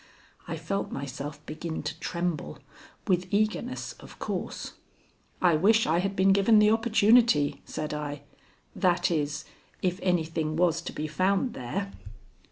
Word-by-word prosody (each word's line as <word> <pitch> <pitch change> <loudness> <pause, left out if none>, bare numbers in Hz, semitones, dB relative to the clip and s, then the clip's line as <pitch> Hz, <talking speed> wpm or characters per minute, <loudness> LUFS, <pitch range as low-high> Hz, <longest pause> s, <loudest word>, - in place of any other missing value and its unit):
I - - -3
felt 200 0 -3
myself 140 +2 -6
begin 160 +1 -5
to 150 +2 -5
tremble, 170 - -3 0.5
with 180 -1 +1
eagerness, 215 +4 -1
of - - -13
course. - - -4 0.7
"I 175 -3 +5
wish 215 +7 +4
I 165 +2 +2
had 195 +2 -1
been 195 +1 +5
given 200 +3 +5
the 210 0 +6
opportunity," 220 - +4
said 150 -1 -4
I 145 -1 -4 0.5
"that 180 -1 +2
is, 150 -2 -1 0.4
if 180 0 0
anything 160 -3 0
was 170 -1 +2
to - - -6
be 150 - -4
found 195 - +1
there." 195 +11 -4
175 Hz, 140 wpm, -28 LUFS, 150-200 Hz, 0.7 s, the